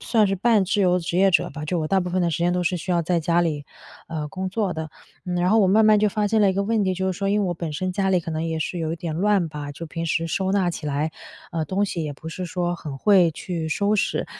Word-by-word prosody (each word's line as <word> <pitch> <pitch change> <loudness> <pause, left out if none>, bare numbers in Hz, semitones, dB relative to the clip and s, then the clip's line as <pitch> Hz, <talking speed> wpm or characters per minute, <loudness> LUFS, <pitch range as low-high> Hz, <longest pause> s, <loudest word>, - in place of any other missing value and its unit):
算 220 -3 +2
是 195 - 0
半 210 0 +3
自 205 +3 0
由 180 0 +3
职 175 0 -3
业 195 0 +5
者 - - +2
吧， 150 +1 -6
就 175 +2 -1
我 155 - -1
大 195 - +3
部 180 - -3
分 185 - 0
的 170 - +1
时 155 - -2
间 175 +1 +2
都 180 0 0
是 180 +1 0
需 185 - -5
要 175 - +3
在 170 +1 +1
家 170 +2 +2
里， 150 -4 -2 0.4
呃， 155 -2 -3
工 190 +2 -4
作 200 -1 -1
的。 160 -1 -5 0.3
嗯， 180 -1 -3
然 175 +1 +2
后 220 - +5
我 200 - +5
慢 215 +4 +4
慢 215 -1 +6
就 210 - +3
发 210 +1 0
现 220 +1 +2
了 205 - +5
一 - - -1
个 200 - +1
问 215 0 +1
题， 185 - +1
就 190 +1 -1
是 180 - -5
说， 195 -1 -1
因 210 - +2
为 - - 0
我 - - 0
本 165 -2 -5
身 185 +5 -2
家 195 +1 0
里 180 -2 +3
可 165 - -6
能 160 +1 -2
也 165 -1 -2
是 170 +2 -3
有 160 -1 -2
一 - - -3
点 165 -1 -4
乱 195 -3 +2
吧。 145 -1 -6
就 165 +4 -8
平 165 +1 -5
时 165 +1 0
收 190 +3 -1
纳 190 -3 +2
起 160 - -6
来， 150 +2 -1 0.4
呃， 160 -2 -2
东 190 +6 0
西 170 -5 -3
也 150 - -4
不 160 +3 -9
是 180 +3 -5
说 175 0 -2
很 150 -4 -7
会 185 -3 +5
去 165 -1 -4
收 205 +5 +1
拾。 205 - 0
180 Hz, 335 characters per minute, -23 LUFS, 165-195 Hz, 0.4 s, 慢